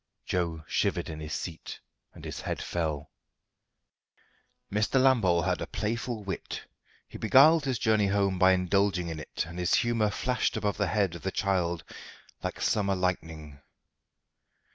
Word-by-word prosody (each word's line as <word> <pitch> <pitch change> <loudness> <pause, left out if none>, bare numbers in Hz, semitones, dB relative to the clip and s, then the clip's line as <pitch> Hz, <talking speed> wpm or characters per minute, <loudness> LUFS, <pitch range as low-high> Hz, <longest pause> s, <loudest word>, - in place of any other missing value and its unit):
Joe 85 -3 -2
shivered - - -1
in 80 - -7
his 75 0 -7
seat, 80 +3 -6 0.4
and - - -11
his - - -5
head - - -3
fell. 80 -3 -3 1.6
Mr. 105 +5 +2
Lambole 110 -11 +4
had 90 0 0
a - - -3
playful 110 +1 -3
wit. 95 -1 -5 0.4
He - - -10
beguiled 145 +7 +6
his 130 -3 0
journey 110 -2 +2
home 100 -2 +1
by 95 +1 +6
indulging 95 -1 +1
in 80 -1 -5
it, - - -4
and 85 +2 -8
his 90 - +2
humour 115 -3 +2
flashed 125 +3 -1
above 105 -1 -1
the - - +1
head 100 -5 +1
of 85 - -8
the 95 - -2
child 90 -4 0 0.6
like - - -4
summer 100 -2 +1
lightning. 80 -6 -3
95 Hz, 150 wpm, -28 LUFS, 85-110 Hz, 1.6 s, beguiled